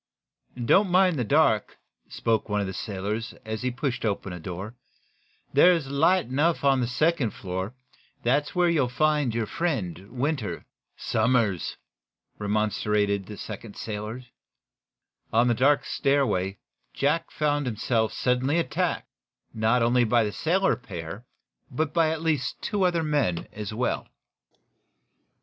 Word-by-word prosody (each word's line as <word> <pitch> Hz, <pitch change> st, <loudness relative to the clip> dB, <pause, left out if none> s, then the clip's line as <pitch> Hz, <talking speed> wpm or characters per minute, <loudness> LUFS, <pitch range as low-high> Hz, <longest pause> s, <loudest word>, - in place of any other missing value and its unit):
"Don't 195 Hz, -, +4 dB
mind 180 Hz, -4 st, +4 dB
the -, -, +1 dB
dark," 115 Hz, -4 st, +2 dB, 0.3 s
spoke 110 Hz, -1 st, 0 dB
one 105 Hz, 0 st, +1 dB
of 100 Hz, -, 0 dB
the 95 Hz, -, -4 dB
sailors, 105 Hz, +4 st, -4 dB
as 110 Hz, 0 st, -4 dB
he 125 Hz, -, 0 dB
pushed 130 Hz, 0 st, -3 dB
open 100 Hz, -3 st, -2 dB
a 90 Hz, -, -6 dB
door. 95 Hz, +6 st, -6 dB, 0.8 s
"There's 150 Hz, -1 st, +5 dB
light 165 Hz, +6 st, +3 dB
enough 145 Hz, +7 st, +1 dB
on 135 Hz, -2 st, +4 dB
the 120 Hz, -, 0 dB
second 135 Hz, 0 st, +1 dB
floor. 95 Hz, +5 st, -4 dB, 0.5 s
That's 140 Hz, +7 st, +1 dB
where 180 Hz, -1 st, +4 dB
you'll 150 Hz, -7 st, +2 dB
find 150 Hz, -2 st, +1 dB
your 115 Hz, -1 st, 0 dB
friend, 105 Hz, -, -3 dB
Winter." 130 Hz, -2 st, -2 dB, 0.3 s
"Somers," 115 Hz, -9 st, +1 dB, 0.6 s
remonstrated 105 Hz, -1 st, 0 dB
the 105 Hz, -, -8 dB
second 115 Hz, -3 st, -8 dB
sailor. 110 Hz, +3 st, -5 dB, 1.1 s
On 115 Hz, +2 st, +4 dB
the 120 Hz, -, +4 dB
dark 140 Hz, +5 st, +3 dB
stairway 105 Hz, -9 st, +1 dB, 0.4 s
Jack 160 Hz, +4 st, +1 dB
Benson -, -, -21 dB
found 145 Hz, -1 st, +1 dB
himself 110 Hz, 0 st, 0 dB
suddenly 130 Hz, +5 st, +1 dB
attacked, 170 Hz, -, -1 dB, 0.5 s
not 110 Hz, +2 st, +2 dB
only 120 Hz, +1 st, +4 dB
by 120 Hz, 0 st, +3 dB
the 105 Hz, -, -1 dB
sailor 185 Hz, -, +1 dB
pair, 95 Hz, -1 st, -8 dB, 0.4 s
but 145 Hz, +2 st, -2 dB
by 165 Hz, -2 st, +3 dB
at 160 Hz, 0 st, -3 dB
least 150 Hz, -5 st, 0 dB
two 200 Hz, -2 st, +1 dB
other 170 Hz, -2 st, +1 dB
men, 145 Hz, -, 0 dB
as 105 Hz, -1 st, -5 dB
well. 120 Hz, +4 st, -1 dB
125 Hz, 140 wpm, -26 LUFS, 105-150 Hz, 1.1 s, There's